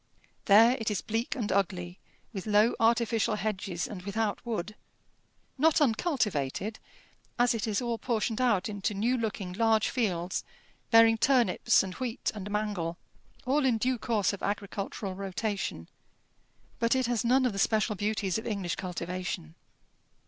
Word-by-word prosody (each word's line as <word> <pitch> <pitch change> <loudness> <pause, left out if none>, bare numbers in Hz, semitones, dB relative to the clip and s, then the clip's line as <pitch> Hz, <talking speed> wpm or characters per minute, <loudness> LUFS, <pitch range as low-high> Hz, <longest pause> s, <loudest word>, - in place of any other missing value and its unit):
There 225 +5 +6
it 225 - -1
is 210 - -1
bleak 225 +2 -2
and 225 -5 -2
ugly, 180 -2 -1 0.3
with 195 0 -6
low 210 +2 +4
artificial 230 -1 +2
hedges 195 -5 -3
and 200 -4 -7
without 205 +2 -2
wood; 215 -4 -3 0.9
not 320 +2 +4
uncultivated, 220 - 0 0.6
as 245 0 +3
it 225 -1 -2
is 215 +2 0
all 235 -1 -2
portioned 230 -1 -1
out 220 -6 +2
into 205 0 -3
new 230 +6 +1
looking 210 -6 -3
large 220 +1 +2
fields, 185 -8 -1 0.5
bearing 225 -1 +6
turnips 245 -4 +3
and 190 -1 -5
wheat 250 +1 -3
and 205 -2 -6
mangel, 205 -5 -2 0.5
all 280 +3 +2
in 250 -4 +3
due 250 +2 0
course 215 -4 0
of 200 - -7
agricultural 200 -1 -3
rotation; 195 - -3 0.9
but 230 +2 +2
it 260 -1 +1
has 240 -2 0
none 255 +2 +3
of 245 - +1
the 195 - -4
special 215 +1 +2
beauties 210 -1 -1
of 220 - -7
English 200 -6 -2
cultivation. 180 - -4
215 Hz, 150 wpm, -29 LUFS, 195-235 Hz, 0.9 s, There